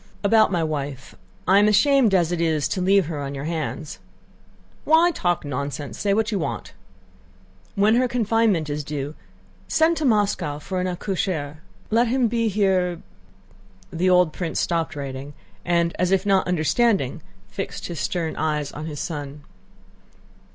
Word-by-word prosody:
"About 215 +1 +4
my 175 -3 +1
wife... 145 -4 -4 0.3
I 195 +2 +6
am 205 - +4
ashamed 225 +1 +4
as 175 -2 +2
it 175 -1 -1
is 155 -4 +1
to 185 - -2
leave 195 0 +4
her 150 -2 -4
on 140 0 -5
your 135 - -5
hands...." 150 - -4 0.8
"Why 325 +3 +5
talk 175 - -1
nonsense? 140 +1 -4
Say 200 - 0
what 220 +2 +1
you 200 - 0
want." - - -4 1.0
"When 205 +2 +4
her 255 0 +3
confinement 225 -8 +1
is 150 0 -3
due, 145 0 -4 0.5
send 320 +1 +2
to 310 - -1
Moscow 205 - +1
for 180 +5 -4
an 185 - -1
accoucheur.... 175 -5 -3 0.3
Let 235 +2 +3
him 250 +1 +2
be 230 0 0
here...." 185 -4 +1 0.9
The 180 +3 +1
old 180 -3 +4
prince 165 -3 -3
stopped 165 -2 -1
writing 140 0 -6 0.3
and, 170 -1 +1
as 180 - +2
if 190 +1 +2
not 195 -3 +2
understanding, 180 - +1 0.3
fixed 195 - -5
his 170 -4 -5
stern 165 +3 -2
eyes 150 -2 -1
on 155 +2 -7
his 150 -2 -6
son. 145 -3 -5
175 Hz, 160 wpm, -23 LUFS, 150-205 Hz, 1.0 s, I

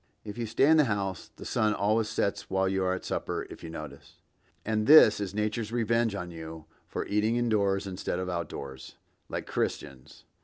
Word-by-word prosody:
(If 105 - -6
you 115 -1 -3
stay 115 - +3
in 160 +1 +6
the 150 - +5
house 100 -5 -2
the - - -10
sun 105 -1 +1
always 110 +2 +1
sets 100 - -1
while 95 0 +1
you 95 0 0
are 95 0 +1
at 95 - -8
supper, - - -3
if - - -10
you 85 - -6
notice; 75 -3 -9 0.5
and 110 0 0
this 150 -9 +8
is 100 -1 -4
nature's 110 +1 -1
revenge 115 -2 +1
on 90 -3 -5
you 80 -1 -8 0.2
for - - -4
eating 105 +3 +1
indoors 105 -5 +1
instead 90 -2 -3
of 90 0 -3
out 90 -2 -1
of 85 - -8
doors, 65 -2 -8 0.3
like - - -4
Christians.) 65 -1 -4
100 Hz, 200 wpm, -29 LUFS, 90-110 Hz, 0.5 s, this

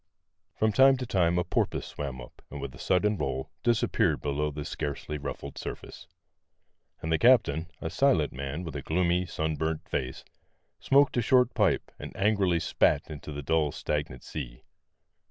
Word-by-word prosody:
From 110 0 +2
time 135 +4 +6
to 125 - -4
time 90 -5 +2
a 90 - +2
porpoise - - -1
swam 70 -3 -6
up, - - -13
and 75 - -7
with 70 -2 -6
a 60 - -13
sudden 105 +3 +2
roll 65 +1 -3
disappeared 120 -2 +2
below 75 +1 -1
the 75 0 -6
scarcely 75 0 -4
ruffled 70 0 -6
surface. - - -8 1.0
And 80 - -2
the 80 - +2
captain, 85 -8 +4
a 80 - -3
silent 95 - +2
man 70 +5 -4
with 80 -4 -7
a 70 - -3
gloomy, 90 +3 +1
sunburnt 80 -1 -2
face, 65 0 -3 0.5
smoked 140 -1 +3
a - - +4
short 125 +1 +4
pipe - - +1
and - - -8
angrily 95 -4 +2
spat 75 -1 +1
into 75 0 -7
the 75 0 -6
dull, 75 0 +1
stagnant 70 -5 -3
sea. - - -7
80 Hz, 165 wpm, -28 LUFS, 70-100 Hz, 1.0 s, time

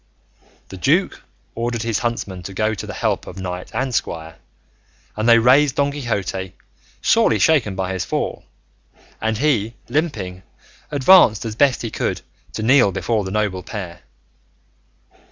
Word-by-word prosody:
The - - -9
duke - - +1 0.3
ordered 115 0 -2
his 115 -3 -1
huntsmen 110 -6 -3
to 95 - -11
go 110 +2 +1
to 100 - -6
the - - -6
help - - -1
of 90 - -9
knight 90 -1 -5
and 130 +2 -2
squire, 80 -6 -3 0.8
and 110 +2 0
they 115 - +8
raised 130 +4 +4
Don 140 0 +1
Quixote, 100 -9 -3 0.5
sorely 110 - +4
shaken 115 -6 +2
by 95 0 -2
his 95 -1 -2
fall; - - -3 0.8
and 110 0 0
he, 115 -5 +1
limping, 105 - -2 0.5
advanced 140 - +5
as 110 -1 -4
best 135 0 +2
he 115 - -4
could - - -2 0.3
to 110 - -4
kneel 125 -3 +5
before 100 +3 -1
the 95 - -5
noble 100 -2 -1
pair. 90 -3 -7
110 Hz, 150 wpm, -20 LUFS, 95-125 Hz, 0.8 s, they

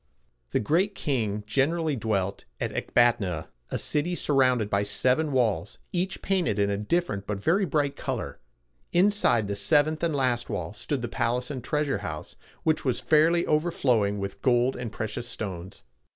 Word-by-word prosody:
The - - +1
Great 180 - +1
King 110 - -1
generally 150 +6 +1
dwelt 100 -5 -2
at - - -2
Ec - - -5
bat´a 120 -1 +5
na, 90 -6 -3 0.3
a - - -1
city 160 +4 -1
surrounded 130 -8 +2
by 100 -1 +1
seven 125 +9 +1
walls, 115 -5 0
each 185 +2 -2
painted 180 - +1
in 100 0 +2
a 100 - 0
different 105 - -1
but 105 - -2
very 185 - +2
bright 145 -3 0
color. - - -4 0.5
Inside 175 - +3
the 100 - -2
seventh 150 +9 +3
and 165 -3 0
last 125 -3 0
wall 100 -1 -3
stood 125 +4 -3
the - - -1
palace 125 +3 -1
and 130 -4 -5
treasure 145 -5 0
house, 80 -6 -6 0.3
which 160 -1 +1
was 130 -3 0
fairly 160 +2 +3
overflowing 130 -10 +1
with 100 0 -5
gold 125 0 +3
and 120 -3 -5
precious 110 +2 -4
stones. 95 -5 -6
125 Hz, 165 wpm, -27 LUFS, 105-155 Hz, 0.5 s, bat´a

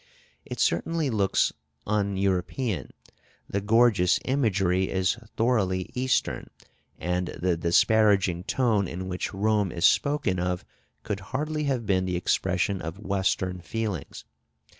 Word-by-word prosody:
It - - -7
certainly 150 - +1
looks 100 -3 +2 0.3
un 100 -2 0
European; 100 +3 -1 0.6
the 100 - -2
gorgeous 105 -4 +4
imagery 95 -8 +1
is 95 -1 +1 0.2
thoroughly 100 -6 +1
Eastern, 130 +1 0 0.5
and 90 0 -1
the 90 -1 +1
disparaging 95 +1 +3
tone 110 -5 +1
in 95 +2 -5
which 90 0 -3
Rome 105 -1 +1
is 85 -2 0
spoken 140 -11 +2
of 90 0 -2 0.4
could 105 -2 -3
hardly 150 +8 -3
have 130 -5 -1
been 95 -2 +1
the 90 -1 -1
expression 90 +2 0
of 80 +3 -5
Western 95 -2 -1
feelings. 105 -4 -4
95 Hz, 120 wpm, -26 LUFS, 90-115 Hz, 0.6 s, gorgeous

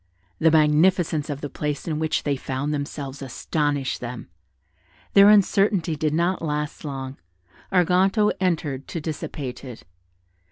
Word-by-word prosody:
The 160 - +5
magnificence 155 0 +3
of 145 -1 -4
the 145 - -3
place 150 0 -4
in 155 -2 -1
which 160 0 0
they 145 -1 0
found 135 +2 -3
themselves 140 -1 -5
astonished 145 +1 -2
them. 120 -6 -7 0.8
Their 200 0 +8
uncertainty 195 -4 +3
did 155 0 0
not 175 +3 +1
last 150 -1 -3
long: 135 -2 -5 0.5
Arganto 190 +3 +3
entered 155 -7 -1
to 165 - -4
dissipate 145 -4 -5
it. 125 -4 -10
150 Hz, 130 wpm, -24 LUFS, 140-175 Hz, 0.8 s, Their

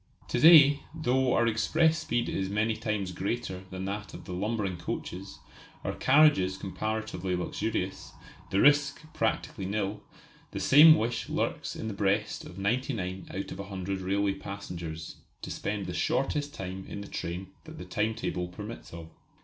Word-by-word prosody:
To - - 0
day, 145 -1 +8 0.2
though 130 -4 +2
our 120 - +3
express 155 +8 +2
speed 120 -6 -1
is 95 0 -2
many 110 +2 +1
times 105 -4 -2
greater 95 0 -3
than 95 0 -5
that 100 +1 -5
of - - -10
the 90 - -6
lumbering 100 -1 -2
coaches, 95 +3 -5 0.5
our - - -2
carriages 130 -10 +4
comparatively 100 -1 -3
luxurious, 90 -1 -3 0.4
the 100 - +1
risk 145 0 +4
practically 110 -3 -1
nil, 100 0 -2 0.5
the - - -5
same 155 +3 +8
wish 120 -1 -2
lurks - - -2
in 110 - -5
the 110 - -3
breast 100 +2 0
of 90 - -11
ninety 120 +8 0
nine 95 -3 -4
out 95 - -5
of - - -7
a 100 - -4
hundred 95 -1 -4
railway 100 +1 +1
passengers 85 -5 -7 0.3
to - - -5
spend 105 -2 -3
the 90 - -4
shortest 145 - 0
time 95 -6 -6
in 100 - -6
the 100 - -8
train 90 +2 -5 0.2
that - - -10
the 90 - -7
time 105 +4 -1
table 90 -5 -3
permits 105 +5 -8
of. 85 -1 -8
100 Hz, 165 wpm, -29 LUFS, 95-120 Hz, 0.5 s, day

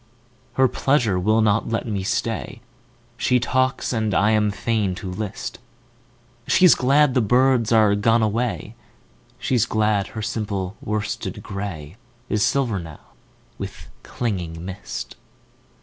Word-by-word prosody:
Her 130 0 +4
pleasure 120 -8 +1
will 110 +4 +3
not 110 +1 +2
let 115 - -1
me 100 -3 -2
stay. 115 +4 -2 0.6
She 125 0 +2
talks 130 +2 0
and 110 -4 0
I 105 +6 +3
am 105 -1 +3
fain 105 -2 -1
to 95 0 -6
list:She's 120 - -1
glad 140 +2 +3
the 125 - +3
birds 125 +1 +3
are 110 -3 +5
gone 115 +3 +3
away, 110 0 -1 0.6
She's 120 -3 +1
glad 105 -2 +1
her 110 - -3
simple 100 -3 -3
worsted 105 -1 -3
grayIs 95 -4 -6 0.4
silver 120 -4 +1
now 80 -3 -11 0.5
with - - -7
clinging 90 -8 -4
mist. 95 +2 -7
110 Hz, 120 wpm, -22 LUFS, 100-120 Hz, 0.6 s, are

